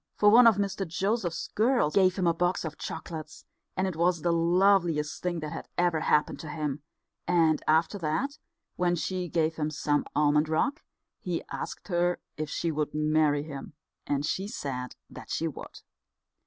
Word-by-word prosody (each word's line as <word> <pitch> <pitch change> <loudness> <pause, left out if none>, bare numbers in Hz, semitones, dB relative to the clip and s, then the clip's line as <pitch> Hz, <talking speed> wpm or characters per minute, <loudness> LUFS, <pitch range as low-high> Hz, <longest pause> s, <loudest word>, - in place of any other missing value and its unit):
For 205 0 +5
one 235 +2 +8
of 225 - +6
Mr 200 -1 -2
Joseph's 185 0 -1
girls 225 - +2
gave 185 -2 +4
him 185 - 0
a 170 - +4
box 175 +1 0
of 155 -1 -5
chocolates, 160 -1 -7 0.3
and 185 - +1
it 185 -3 -2
was 170 0 +1
the 170 -1 +2
loveliest 170 -2 +2
thing 175 -2 -2
that 155 -1 -5
had - - -7
ever 175 -2 +2
happened 150 -1 +1
to 155 - -7
him; 150 -2 -3 0.5
and 165 -3 +3
after 160 +6 +2
that, 245 - -2 0.4
when 175 -1 +2
she 180 +1 -3
gave 160 -1 0
him 155 -1 -1
some 145 -1 0
almond 150 +1 +3
rock, 260 - 0 0.4
he 175 -2 -3
asked - - -6
her 175 0 +1 0.2
if 155 0 -4
she 165 +2 -1
would 150 -1 -2
marry 150 -1 +2
him, 140 -1 -8 0.3
and 145 0 0
she 190 +5 -2
said 130 - -5
that - - -11
she - - -1
would. - - -9
165 Hz, 175 wpm, -28 LUFS, 155-185 Hz, 0.5 s, one